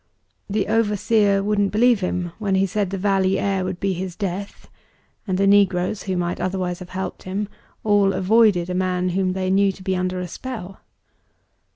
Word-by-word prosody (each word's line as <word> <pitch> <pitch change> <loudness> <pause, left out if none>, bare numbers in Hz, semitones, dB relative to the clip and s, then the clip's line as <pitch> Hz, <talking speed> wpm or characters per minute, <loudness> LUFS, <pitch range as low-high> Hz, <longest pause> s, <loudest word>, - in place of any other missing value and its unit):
The 205 0 0
overseer 210 -2 +2
wouldn't 205 -1 +1
believe 235 +1 +4
him 180 -2 -2
when 200 -3 0
he 190 +1 +3
said 200 0 -1
the 195 - -3
valley 195 -1 +2
air 195 -2 0
would 185 -1 -4
be 195 -1 0
his 180 0 -5
death 200 0 -5 0.6
and 185 -1 0
the 195 - +2
negroes, 195 -1 +3
who 185 - 0
might 175 0 -2
otherwise 185 -1 -2
have 180 -1 -10
helped 190 +1 -5
him, 195 +3 -3 0.4
all 205 -2 +3
avoided 190 -1 +3
a - - -1
man 180 0 0
whom 185 0 0
they 185 0 -1
knew 195 +1 +3
to 190 - -13
be 190 -1 0
under 185 0 -1
a 180 - -4
spell. 195 -2 -7
190 Hz, 185 wpm, -22 LUFS, 185-205 Hz, 0.6 s, believe